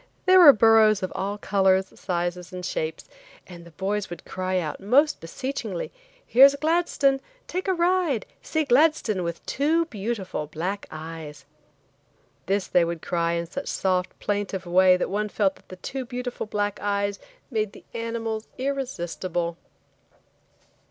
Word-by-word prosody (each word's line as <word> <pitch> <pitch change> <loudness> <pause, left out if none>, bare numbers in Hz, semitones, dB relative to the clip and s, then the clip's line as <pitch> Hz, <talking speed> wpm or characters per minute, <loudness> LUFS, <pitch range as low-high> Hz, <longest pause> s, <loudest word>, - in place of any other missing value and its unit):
There 370 0 +7
were 325 -5 +11
burros 220 -3 +5
of 185 - -2
all 200 +2 -3
colors, 190 -2 +2
sizes 175 -1 -3
and 180 -1 -6
shapes, 160 -3 -3 0.4
and 175 -2 -11
the - - -12
boys 195 +4 -2
would 175 - -9
cry 185 0 -2
out, 160 -4 -3
most 275 +10 +3
beseechingly, 215 0 -4 0.3
"Here's 275 +3 +7
Gladstone! 300 -3 +1 0.2
Take 370 +2 -4
a 380 - +3
ride; 345 - +1 0.2
see 315 -1 -1
Gladstone 270 - +3
with 170 -1 -5
two 320 +4 +1
beautiful 205 - -4
black 180 +7 -4
eyes." 155 -2 -8 1.0
This 195 0 +1
they 175 - +3
would 170 -1 -3
cry 170 -1 0
in 170 0 -1
such 275 +12 -6
a - - -11
soft 185 -1 -1
plaintive 200 -2 -2
way 185 +1 +5
that 180 - -2
one 210 +1 -1
felt 200 -2 0
the 185 - -9
"two 260 +9 -5
beautiful 245 -2 -5
black 205 -1 -2
eyes" 200 0 -1 0.3
made 215 -3 -1
the - - -14
animals 230 -1 -3
irresistible. 185 -10 -3
205 Hz, 145 wpm, -25 LUFS, 180-255 Hz, 1.0 s, were